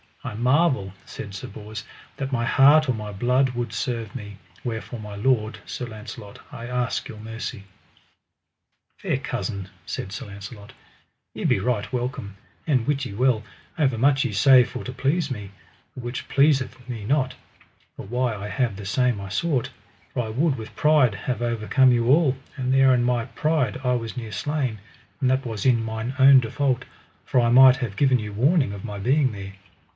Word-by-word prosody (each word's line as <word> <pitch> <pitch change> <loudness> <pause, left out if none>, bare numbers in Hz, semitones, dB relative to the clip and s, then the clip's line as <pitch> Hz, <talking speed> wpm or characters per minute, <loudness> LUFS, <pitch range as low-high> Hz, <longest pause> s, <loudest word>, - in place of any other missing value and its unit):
I - - -5
marvel, 125 - +2
said 100 -2 -8
Sir 95 - -6
Bors, 105 +1 -8 0.3
that 135 -1 -4
my 120 -3 0
heart 145 +4 +6
or - - +3
my 105 -2 -6
blood 125 +6 +2
would 120 -3 -4
serve 115 -1 -3
me, 105 -5 -7 0.3
wherefore 115 0 -5
my 105 -1 -8
lord, 110 -1 0
Sir 125 - -5
Launcelot, 105 -2 -9
I 115 +1 -7
ask 125 0 -2
your 110 - -9
mercy. 110 -2 -6 1.3
Fair - - -1
cousin, 100 -1 -4 0.2
said 95 - -5
Sir 100 - -6
Launcelot, 100 +1 -10 0.6
ye - - -6
be - - +3
right 110 -1 -1
welcome; 120 -6 -4 0.3
and 130 -7 +1
wit 140 -2 0
ye 100 - -6
well, 120 0 +2 0.3
overmuch 135 -1 +3
ye 125 - -1
say 125 +5 +6
for - - -7
to 125 - -5
please 140 +5 0
me, 105 -5 -6 0.4
the 125 - -7
which 120 +1 -5
pleaseth 135 -3 +2
me 115 -4 -5
not, 130 +3 +1 0.6
for - - -8
why 120 +2 -1
I 100 0 -6
have 120 -2 -1
the 100 - -8
same 125 +2 +1
I 100 0 -7
sought; 125 - 0 0.4
for 125 - 0
I 110 - -5
would 140 +6 +1
with 110 -3 -9
pride 150 -7 +4
have 125 +4 -3
overcome 120 +3 +3
you 120 -1 +2
all, 140 -1 +4 0.2
and 130 -1 0
there 135 -1 +6
in 120 -1 +2
my 120 -1 +1
pride 150 -1 0
I 125 -1 +2
was 115 0 -3
near 115 -3 -5
slain, 130 +1 -2 0.4
and 130 -2 +2
that 130 +1 +1
was 110 -4 -4
in 120 -3 +4
mine 110 +3 -4
own 135 0 +8
default, 130 +2 -1 0.4
for 130 - +1
I 120 -1 +3
might 130 +1 +8
have 120 -6 -4
given 130 +1 +3
you 105 -1 -6
warning 135 - +2
of 100 +1 -7
my 105 -2 -5
being 130 +6 +2
there. 100 -1 -8
120 Hz, 185 wpm, -24 LUFS, 110-130 Hz, 1.3 s, own